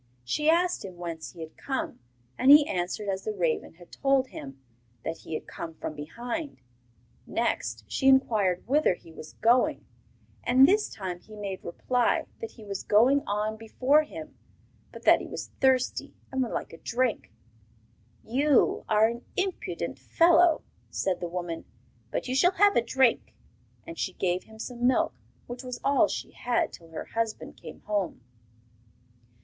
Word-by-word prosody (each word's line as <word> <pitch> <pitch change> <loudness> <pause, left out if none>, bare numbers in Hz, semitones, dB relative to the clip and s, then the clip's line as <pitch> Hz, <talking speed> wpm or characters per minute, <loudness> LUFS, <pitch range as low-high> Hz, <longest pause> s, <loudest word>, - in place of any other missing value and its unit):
She 300 - +1
asked 350 +2 +2
him 185 -2 -8
whence 165 -2 -6
he 170 - -10
had 160 0 -8
come, 265 -1 -3 0.4
and 260 - +2
he 295 +1 +9
answered 180 +4 -2
as 195 -1 -2
the 215 - -2
raven 165 -3 -1
had 175 0 -17
told 270 -1 +2
him, 135 -1 -9 0.4
that 165 - -4
he 160 - -4
came 165 -1 -8
from 155 - -5
behind. 240 - -5 0.7
Next 115 0 -1
she 265 - 0
inquired 215 -9 +3
whither 285 - +3
he 165 - -16
was 155 -1 -11
going, 240 +2 +2 0.6
and 260 +2 +6
this 415 +4 +3
time 185 -4 -5
he 215 +4 -14
made 200 -2 -5
reply 245 +7 0
that 455 - -5
he 220 - -14
was 200 -1 -4
going 250 +7 +4
on 210 +2 -1
before 255 +7 +3
him, 310 0 -9 0.6
but - - -11
that - - +6
he - - -7
was - - -6
thirsty 260 -1 +1 0.2
and 265 0 0
would 245 - -1
like - - -4
a 165 - -11
drink. 245 -1 -1 0.9
'You 275 +4 +2
are 215 0 +5
an 235 +1 -2
impudent 380 -1 -2
fellow,' 335 -1 +4 0.3
said 190 -2 -1
the 175 - -4
woman; 175 -1 -4 0.5
'but - - -3
you 255 - -1
shall 355 +8 +4
have 405 +1 +4
a - - +5
drink.' 235 - +1 0.5
And 165 - -8
she 185 - -2
gave 180 0 -1
him 220 - -15
some 240 +2 -2
milk, 255 - +2 0.3
which 245 +1 -7
was 250 -1 -6
all 280 0 +4
she - - -5
had 245 -1 -1
till 165 - -12
her 160 - -6
husband 225 -1 -3
came - - -11
home. 205 -9 -2
225 Hz, 165 wpm, -28 LUFS, 180-265 Hz, 0.9 s, he